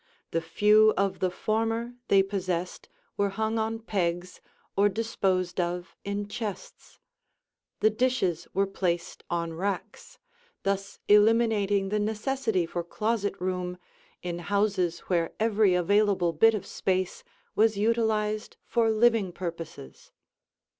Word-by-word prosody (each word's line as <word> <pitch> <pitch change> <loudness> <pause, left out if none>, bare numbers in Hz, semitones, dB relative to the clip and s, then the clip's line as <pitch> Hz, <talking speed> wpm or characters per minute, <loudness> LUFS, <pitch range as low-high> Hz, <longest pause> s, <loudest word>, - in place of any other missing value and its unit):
The 165 - 0
few 210 +6 +4
of 195 0 0
the 185 - +1
former 225 +4 -1
they 195 -1 +5
possessed 185 -3 -3 0.3
were 200 0 +2
hung 220 +3 -1
on 220 +1 -1
pegs 180 -5 -2 0.3
or 205 +1 +4
disposed 190 -4 -1
of 175 +1 -2
in 200 0 -3
chests; 210 -2 -7 0.8
the 215 - +5
dishes 215 -8 0
were 195 +2 +2
placed 175 -3 -2
on 170 -1 -2
racks, 190 +3 -4 0.5
thus 195 0 -2
eliminating 210 -2 +4
the 210 +1 0
necessity 220 -2 0
for 170 +1 -4
closet 210 +3 -1
room 180 -1 -2 0.5
in 175 -1 -3
houses 190 -2 0
where 170 -3 -1
every 215 -4 +3
available 190 -1 +2
bit 225 +8 +5
of 195 -2 -4
space 185 -2 -2 0.3
was 220 -1 +3
utilized 215 -1 0
for 230 -1 +2
living 220 -3 +3
purposes. 165 - -8
200 Hz, 120 wpm, -27 LUFS, 180-220 Hz, 0.8 s, they